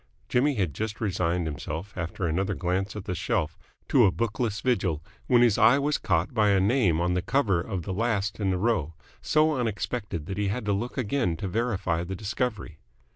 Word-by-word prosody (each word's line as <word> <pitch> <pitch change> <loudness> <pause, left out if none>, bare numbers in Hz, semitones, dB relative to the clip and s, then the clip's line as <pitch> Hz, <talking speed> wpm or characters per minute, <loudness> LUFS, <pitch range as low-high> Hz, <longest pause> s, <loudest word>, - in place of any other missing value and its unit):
Jimmy 140 +3 +2
had 95 - 0
just 110 0 -4
resigned 90 -4 0
himself, 80 +5 -5
after 85 +1 -3
another 95 +4 0
glance 95 +3 -1
at 105 - -6
the 90 - -2
shelf, 80 -1 -1 0.3
to - - +6
a - - +3
bookless 110 0 -1
vigil, 95 -11 0 0.2
when 120 -2 +5
his 115 -4 +3
eye 115 +5 +6
was 145 +1 0
caught 85 +7 0
by 105 -3 +3
a 100 -1 +4
name 100 -5 +3
on 90 +1 +1
the 90 - +1
cover 100 -4 +1
of 95 -2 -4
the 95 - -4
last 105 -1 -1
in 100 -2 0
the 95 - +1
row 90 -7 0 0.3
so 155 0 +3
unexpected 105 - -3
that 95 +4 -4
he 105 - +1
had 105 +3 -2
to 105 - +1
look 120 +7 -3
again 115 -8 0
to 95 - -4
verify 95 -5 -1
the 95 +2 -5
discovery. 105 -4 -3
100 Hz, 200 wpm, -27 LUFS, 90-115 Hz, 0.3 s, to